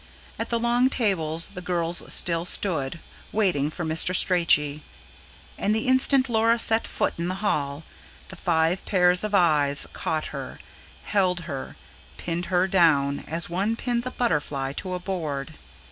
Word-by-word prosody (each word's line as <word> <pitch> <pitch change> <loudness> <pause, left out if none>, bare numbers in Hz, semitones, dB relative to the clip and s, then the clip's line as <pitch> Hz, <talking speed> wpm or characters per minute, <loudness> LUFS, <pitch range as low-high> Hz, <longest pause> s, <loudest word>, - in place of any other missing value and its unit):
At - - -3
the 235 - 0
long 240 +2 +2
tables 165 - +1
the 180 - -9
girls 175 -1 0
still 170 -1 +1
stood, 170 -5 0 0.3
waiting 180 -9 +1
for 170 +2 -6
Mr. 160 +3 +4
Strachey; 155 -5 +2 0.8
and 210 - +1
the 220 - -2
instant 260 +1 +4
Laura 230 0 +2
set 225 0 +1
foot - - -1
in 170 - -2
the 185 - -3
hall, 150 -7 -2 0.5
five 170 -1 0
pairs 180 -1 +3
of 210 -1 -1
eyes 150 -6 +4
caught 155 -1 -3
her, - - -7 0.5
held 185 -3 0
her, 140 -5 -7 0.4
pinned 175 +1 -3
her 185 0 +1
down, 150 -7 +2
as 165 +2 -4
one 195 +6 -1
pins 240 +1 -2
a - - -1
butterfly 145 - -2
to 185 +5 -5
a - - -4
board. 160 -6 -4
180 Hz, 150 wpm, -24 LUFS, 155-205 Hz, 0.8 s, Mr